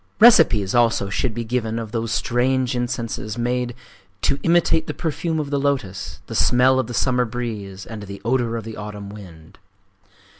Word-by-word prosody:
Recipes 160 Hz, -, +6 dB
also 115 Hz, -5 st, +2 dB
should 110 Hz, +2 st, -1 dB
be 120 Hz, -, -2 dB
given 115 Hz, -1 st, -2 dB
of 115 Hz, -2 st, -5 dB
those 115 Hz, 0 st, -2 dB
strange 125 Hz, +1 st, +1 dB
incenses 120 Hz, -3 st, -3 dB
made 120 Hz, 0 st, -1 dB, 0.5 s
"to 140 Hz, -, +1 dB
imitate 165 Hz, -1 st, +3 dB
the -, -, -4 dB
perfume 160 Hz, 0 st, -2 dB
of 145 Hz, -2 st, -3 dB
the 140 Hz, -, +1 dB
lotos, 125 Hz, -10 st, -2 dB
the -, -, -8 dB
smell 130 Hz, +1 st, +4 dB
of 130 Hz, -, -1 dB
the 120 Hz, -, -6 dB
summer 125 Hz, -1 st, +2 dB
breeze, 110 Hz, -5 st, -5 dB
and 110 Hz, -2 st, -7 dB
the 100 Hz, -1 st, -8 dB
odor 120 Hz, -1 st, +1 dB
of 115 Hz, -, -5 dB
the 110 Hz, 0 st, -8 dB
autumn 105 Hz, -1 st, -7 dB
wind." 90 Hz, -6 st, -12 dB
120 Hz, 175 wpm, -22 LUFS, 105-130 Hz, 0.5 s, Recipes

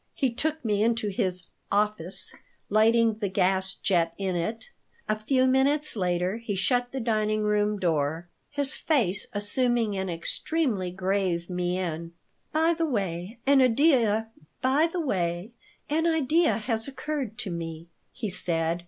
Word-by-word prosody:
He 265 Hz, -3 st, +1 dB
took 315 Hz, +2 st, -2 dB
me 210 Hz, -2 st, +1 dB
into 230 Hz, -2 st, +1 dB
his 185 Hz, -2 st, -1 dB, 0.3 s
"office," 205 Hz, -3 st, -1 dB, 0.4 s
lighting 225 Hz, +1 st, +4 dB
the 205 Hz, -3 st, -1 dB
gas 190 Hz, 0 st, +2 dB
jet 170 Hz, -3 st, +1 dB
in 190 Hz, -2 st, -1 dB
it. 220 Hz, -, -3 dB, 0.4 s
A 215 Hz, -, +2 dB
few 255 Hz, +4 st, +2 dB
minutes 275 Hz, +3 st, +2 dB
later 180 Hz, 0 st, 0 dB
he 230 Hz, -3 st, -4 dB
shut 245 Hz, +5 st, +1 dB
the 265 Hz, -, -3 dB
dining 215 Hz, -2 st, 0 dB
room 210 Hz, 0 st, +1 dB
door, 160 Hz, -2 st, 0 dB, 0.2 s
his 285 Hz, -2 st, 0 dB
face 215 Hz, -, 0 dB
assuming 225 Hz, +1 st, 0 dB
an 190 Hz, -1 st, -2 dB
extremely 195 Hz, -, -1 dB
grave 185 Hz, -1 st, -1 dB
mien 175 Hz, -2 st, -2 dB, 0.4 s
"By 320 Hz, +2 st, +3 dB
the 330 Hz, 0 st, 0 dB
way, 195 Hz, -, -3 dB
an 275 Hz, 0 st, +5 dB
idea 245 Hz, -4 st, +4 dB, 1.7 s
has 310 Hz, -8 st, +1 dB
occurred 275 Hz, -4 st, -4 dB
to 225 Hz, -7 st, -4 dB
me," 165 Hz, -1 st, -5 dB, 0.2 s
he 230 Hz, -, -4 dB
said. 170 Hz, -3 st, -1 dB
210 Hz, 125 wpm, -27 LUFS, 180-255 Hz, 1.7 s, an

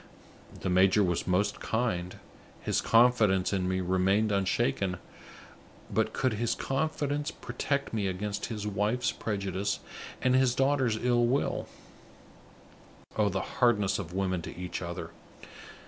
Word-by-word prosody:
The -, -, -1 dB
major 95 Hz, +3 st, +5 dB
was 90 Hz, -2 st, -1 dB
most 100 Hz, +3 st, +1 dB
kind; 95 Hz, -6 st, -1 dB, 0.4 s
his -, -, 0 dB
confidence 115 Hz, -6 st, +4 dB
in 90 Hz, -2 st, 0 dB
me 95 Hz, 0 st, 0 dB
remained 95 Hz, +4 st, +2 dB
unshaken; 100 Hz, 0 st, 0 dB, 1.0 s
but -, -, +1 dB
could 130 Hz, -3 st, 0 dB
his 115 Hz, +2 st, 0 dB
confidence 145 Hz, +1 st, -1 dB
protect 140 Hz, -1 st, -3 dB
me 105 Hz, -3 st, 0 dB
against 100 Hz, +2 st, -3 dB
his 105 Hz, -3 st, -5 dB
wife's 105 Hz, +5 st, 0 dB
prejudice 100 Hz, -2 st, -2 dB, 0.4 s
and 130 Hz, 0 st, +2 dB
his 130 Hz, -2 st, +3 dB
daughter's 135 Hz, -4 st, +2 dB
ill 120 Hz, 0 st, +2 dB
will? 135 Hz, +4 st, 0 dB, 1.5 s
Oh, 105 Hz, -2 st, +2 dB
the 95 Hz, -1 st, -4 dB
hardness 105 Hz, -5 st, +3 dB
of 85 Hz, -4 st, -6 dB
women 95 Hz, -1 st, -1 dB
to -, -, -8 dB
each 90 Hz, 0 st, -5 dB
other! 85 Hz, -1 st, -5 dB
105 Hz, 130 wpm, -29 LUFS, 95-120 Hz, 1.5 s, major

